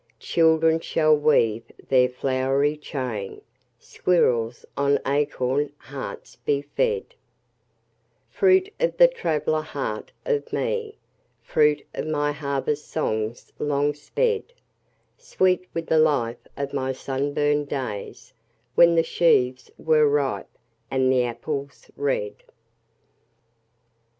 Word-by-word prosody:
Children 160 -1 +3
shall 155 -1 +3
weave 115 -7 +2 0.3
there 130 -1 +5
a - - -15
flowery 135 +3 0
chain, 125 -9 -5 0.4
Squirrels 120 -7 0
on 140 0 +2
acorn 140 0 0
hearts 140 -2 -8
be 140 -1 -1
fed:— 460 - -1 1.1
Fruit 380 +1 +3
of - - 0
the - - +8
traveller 155 - -1
heart 135 -8 -5
of 460 -3 -1
me, 455 -3 -2 0.5
Fruit 150 -1 +2
of - - -4
my 145 -1 0
harvest 145 0 -2
songs 110 -6 -3
long 145 0 +1
sped: 455 - -1 0.7
Sweet 185 -1 +1
with 165 -1 -4
the 160 - +3
life 130 -7 +1
of 140 0 -4
my 130 -1 -1
sunburned 145 +2 -1
days 125 -8 -5 0.4
When 170 +4 +6
the 165 - +4
sheaves 130 -7 +2
were 155 -2 +3
ripe, 145 -2 -1 0.4
and 130 -1 +2
the 125 -1 +3
apples 135 +3 -5
red. 135 -7 -1
145 Hz, 110 wpm, -24 LUFS, 130-160 Hz, 1.1 s, the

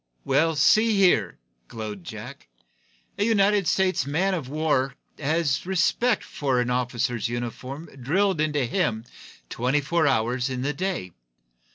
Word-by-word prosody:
"Why, 165 +1 +2
see 215 +9 +4
here," 175 - +3 0.3
glowed 105 -4 -7
Jack, - - -9 0.7
"a - - +3
United 205 -3 +3
States 190 -5 +2
Man 170 +8 0
of 155 -8 -4
warsman 140 -3 0 0.2
has 155 -1 0
respect 195 +5 +1
for 135 -4 -1
an 125 0 0
officer's 120 -1 -1
uniform 125 +5 -5 0.2
drilled 185 +6 +1
into 150 -3 +1
him 115 -1 -1 0.4
twenty 125 +5 0
four 160 +2 +1
hours 125 0 +1
in 130 -1 -3
the 145 +2 -1
day. 175 - -3
145 Hz, 135 wpm, -25 LUFS, 125-185 Hz, 0.7 s, see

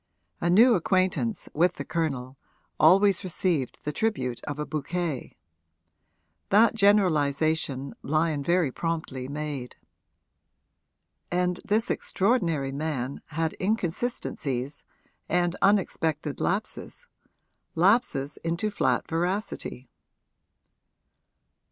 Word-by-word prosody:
A 170 - 0
new 230 +8 +7
acquaintance, 185 +4 0
with 175 +4 +2
the - - -6
Colonel, 135 -6 -2 0.4
always 195 +4 +5
received 175 -7 0
the 150 - -1
tribute 135 - -2
of 145 - -4
a 150 - -3
bouquet: 155 -1 -3 1.1
that 215 +4 +5
generalisation 155 - +2
Lyon 155 0 0
very 170 -1 +2
promptly 155 -5 -3
made. 145 -3 -5 1.5
And 180 0 0
this 225 +4 +1
extraordinary 175 - 0
man 140 -2 -3
had 160 +1 -2
inconsistencies 170 - -2 0.5
and 175 0 +1
unexpected 165 -7 +1
lapses 205 - -3 0.7
lapses 175 - +2
into 170 +6 -1
flat 205 - 0
veracity. 175 - -3
165 Hz, 90 wpm, -27 LUFS, 145-190 Hz, 1.5 s, new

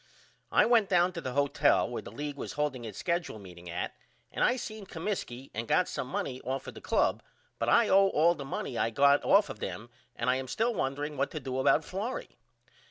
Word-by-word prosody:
I - - +5
went 230 -4 +4
down 180 -1 +3
to 170 - -5
the 130 - -4
hotel 140 +1 +3
where - - -4
the - - -10
league 145 +5 -5
was - - -6
holding 145 -5 -2
its 105 -3 -7
skedule 170 -7 -2
meeting 90 -3 -11
at 85 +1 -3 0.4
and - - -1
I 245 - +4
seen 215 -5 -7
Comiskey 160 -9 -4
and 115 +2 -4
got 180 - +3
some 125 - -4
money 130 0 -3
off 130 +2 -3
of - - -7
the - - -11
club - - +1 0.4
but - - 0
I - - +5
owe 195 +1 +6
all 170 -1 +4
the 150 - -7
money 135 -2 -4
I 115 - +2
got 140 +4 +4
off 200 +1 +5
of 105 - -8
them 105 +6 -6 0.2
and 120 - -3
I 125 +1 +3
am 130 0 -5
still 230 - 0
wondering 145 -3 -2
what - - +1
to 155 - -5
do 130 -2 -3
about 145 +3 +3
Florrie. 210 +8 -5
140 Hz, 225 wpm, -30 LUFS, 125-180 Hz, 0.4 s, owe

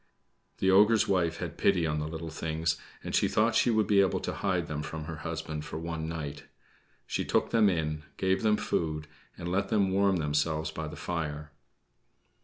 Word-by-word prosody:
The 95 - +3
ogre's 105 +3 +5
wife 85 -3 +1
had - - -6
pity 90 -4 +3
on 75 -1 0
the 75 - -2
little 80 0 -6
things, 80 0 -1 0.3
and - - -5
she - - +3
thought 115 +2 +2
she 120 - +3
would 110 -2 +3
be 100 0 +5
able 95 - +2
to - - -3
hide 90 -4 0
them 75 -2 -4
from 80 +1 -5
her 80 +1 -6
husband 80 -1 -4
for 75 - -6
one 80 -1 -4
night. 75 -3 -5 0.6
She - - -2
took - - +1
them 110 -3 +5
in, 75 -4 -1 0.2
gave 95 0 +1
them 105 -1 +3
food, 75 -2 -2 0.3
and 85 - -5
let 100 +2 0
them 100 -3 +2
warm 100 0 +3
themselves 80 0 0
by 80 -1 -5
the - - -7
fire. 75 -3 -4
80 Hz, 195 wpm, -29 LUFS, 75-95 Hz, 0.6 s, ogre's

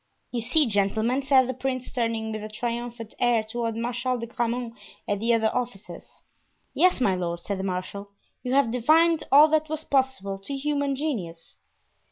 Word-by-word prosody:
"You 240 - -2
see; 270 +7 +3
gentlemen!" 220 +4 +1
said 265 -2 +4
the 260 - -2
prince, 255 0 -3
turning 230 -3 -1
with 215 -1 -5
a 215 - -6
triumphant 235 0 -5
air 240 -2 +3
toward 230 0 -3
Marshal 245 +2 -2
de 230 - -5
Grammont 235 0 -2 0.3
and 205 0 -1
the 230 +1 +2
other 220 -1 +2
officers. 240 -5 -6 0.5
"Yes, 365 -4 +3
my 205 -7 +2
lord," 175 -2 -3
said 200 +2 -4
the - - -3
marshal, 195 +2 -4 0.3
"you 250 - -3
have 275 -5 +3
divined 315 +7 +3
all 290 +3 +8
that 310 0 +1
was 315 0 -3
possible 260 -10 0
to 275 +9 -5
human 285 -1 -1
genius." 200 - -5
240 Hz, 175 wpm, -25 LUFS, 215-265 Hz, 0.5 s, all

